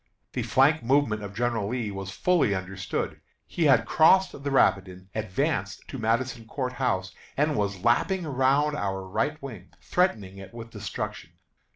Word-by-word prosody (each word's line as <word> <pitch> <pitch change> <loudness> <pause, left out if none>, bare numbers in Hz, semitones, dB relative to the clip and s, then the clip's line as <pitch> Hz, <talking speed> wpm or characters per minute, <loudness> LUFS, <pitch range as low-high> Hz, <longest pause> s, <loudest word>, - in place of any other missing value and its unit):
The - - -1
flank 140 +4 +3
movement 120 -3 +2
of 100 -1 -7
General 115 -3 0
Lee 115 -2 -2
was 95 -1 -6
fully 140 - +2
understood. 95 0 -4 0.2
He 170 - -1
had 135 -3 +5
crossed 185 +4 +5
the 140 0 -5
Rapidan, 95 -7 +1
advanced 105 -4 -2
to - - -6
Madison 115 +1 -1
Court 125 0 -3
House, 95 -8 -1 0.2
and 150 +1 +2
was 100 -4 -2
lapping 175 +10 +2
around 140 +2 +2
our 95 -5 -2
right 145 +11 -1
wing, 110 -9 -8
threatening 105 - 0
it 95 +4 -11
with 115 -1 -8
destruction. - - -6
115 Hz, 155 wpm, -27 LUFS, 95-140 Hz, 0.2 s, had